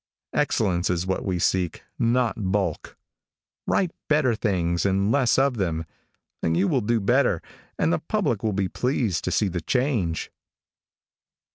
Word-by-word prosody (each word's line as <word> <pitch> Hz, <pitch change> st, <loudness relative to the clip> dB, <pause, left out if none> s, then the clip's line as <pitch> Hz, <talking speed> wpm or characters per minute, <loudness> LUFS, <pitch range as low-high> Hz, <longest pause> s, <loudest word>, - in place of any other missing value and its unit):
Excellence 90 Hz, -2 st, +1 dB
is 90 Hz, 0 st, 0 dB
what 95 Hz, 0 st, -1 dB
we 95 Hz, -3 st, -1 dB
seek, 90 Hz, 0 st, 0 dB, 0.2 s
not 120 Hz, 0 st, +2 dB, 0.2 s
bulk. 95 Hz, -6 st, -2 dB, 0.7 s
Write 185 Hz, -3 st, +1 dB, 0.2 s
better 150 Hz, -5 st, +3 dB
things 90 Hz, -6 st, 0 dB
and 100 Hz, +1 st, +2 dB
less 130 Hz, -3 st, +3 dB
of 135 Hz, -2 st, +2 dB
them, 80 Hz, -5 st, -1 dB, 0.6 s
and 80 Hz, 0 st, +1 dB
you 95 Hz, +3 st, +3 dB
will 130 Hz, -, +1 dB
do 115 Hz, +2 st, +1 dB
better, 105 Hz, -3 st, +2 dB, 0.4 s
and 80 Hz, -, +2 dB
the -, -, +1 dB
public 155 Hz, -, -1 dB
will 110 Hz, -, 0 dB
be 95 Hz, -1 st, 0 dB
pleased 120 Hz, -, -1 dB
to 90 Hz, -, -1 dB
see 105 Hz, -, +2 dB
the 90 Hz, -2 st, -3 dB
change. 115 Hz, -, -1 dB
100 Hz, 150 wpm, -25 LUFS, 90-125 Hz, 0.7 s, better